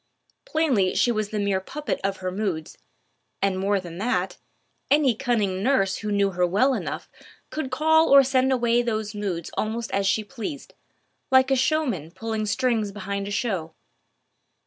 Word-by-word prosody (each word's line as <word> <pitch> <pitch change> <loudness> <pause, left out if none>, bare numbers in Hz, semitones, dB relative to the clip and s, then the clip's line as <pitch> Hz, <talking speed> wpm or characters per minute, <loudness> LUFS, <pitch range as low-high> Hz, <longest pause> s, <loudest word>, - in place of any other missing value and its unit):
Plainly 275 - +1
she 240 - +3
was 215 -2 -1
the 215 - -3
mere 200 -2 +1
puppet 295 +9 -4
of 195 0 -1
her 185 - 0
moods, 185 -5 -3 0.6
and 195 -1 0
more 200 +1 +1
than 175 -1 -9
that, 245 +5 -1 0.5
any 285 -4 +4
cunning 215 -6 0
nurse 205 -5 +2
who 210 -1 -4
knew 200 -1 +2
her 180 0 -1
well 250 +10 +3
enough - - -4 0.4
could 305 -4 -3
call 315 +4 +3
or 275 0 +8
send 260 0 +2
away 240 -2 +2
those 220 -3 -2
moods 190 -6 -4
almost 225 +2 -3
as 195 0 +1
she 215 +2 +2
pleased, 270 +6 -7 0.6
like 260 0 +5
a - - +5
showman 260 - 0
pulling 220 +3 -3
strings 225 -2 0
behind 200 0 -4
a - - -4
show. 195 -7 -2
215 Hz, 165 wpm, -24 LUFS, 195-260 Hz, 0.6 s, or